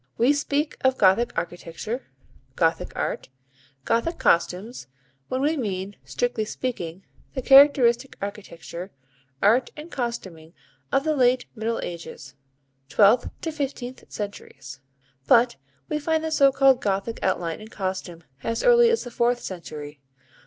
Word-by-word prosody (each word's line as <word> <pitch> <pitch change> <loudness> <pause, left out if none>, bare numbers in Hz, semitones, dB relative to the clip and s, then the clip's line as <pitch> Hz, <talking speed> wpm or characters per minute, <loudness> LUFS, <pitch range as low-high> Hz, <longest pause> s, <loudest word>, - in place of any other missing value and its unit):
We 250 +5 +4
speak 290 +1 -1
of 260 0 +2
Gothic 205 +5 +4
architecture, 175 +8 -5 0.5
Gothic - - +1
art, - - -3 0.6
Gothic 280 +9 0
costumes, 185 - 0 0.4
when 255 - -2
we 300 +3 +2
mean, 200 -6 -3
strictly 245 -3 -1
speaking, 195 -6 -5 0.3
the 260 - -2
characteristic 270 -2 +6
architecture, 195 -3 -7 0.5
art 230 +6 +4
and 310 +3 -9
costuming 190 -10 -5 0.4
of 275 - +2
the 310 0 +1
late 255 -1 +3
Middle 230 0 -2
Ages 165 -5 -8 0.6
(twelfth 220 +4 +4
to 325 - -3
fifteenth 270 -4 -5
centuries). 200 - -7 0.5
But 240 - +5 0.3
we 300 - -1
find 320 +1 0
the 320 - -2
so 280 -3 +5
called 270 -1 +4
Gothic 200 +3 -1
outline 175 -1 -1
in 215 - -10
costume 185 -5 -5 0.2
as 230 +7 -2
early 475 -1 +6
as 465 -1 +1
the 245 - -8
fourth 240 +1 +1
century. 150 -5 -8
235 Hz, 130 wpm, -24 LUFS, 190-270 Hz, 0.6 s, characteristic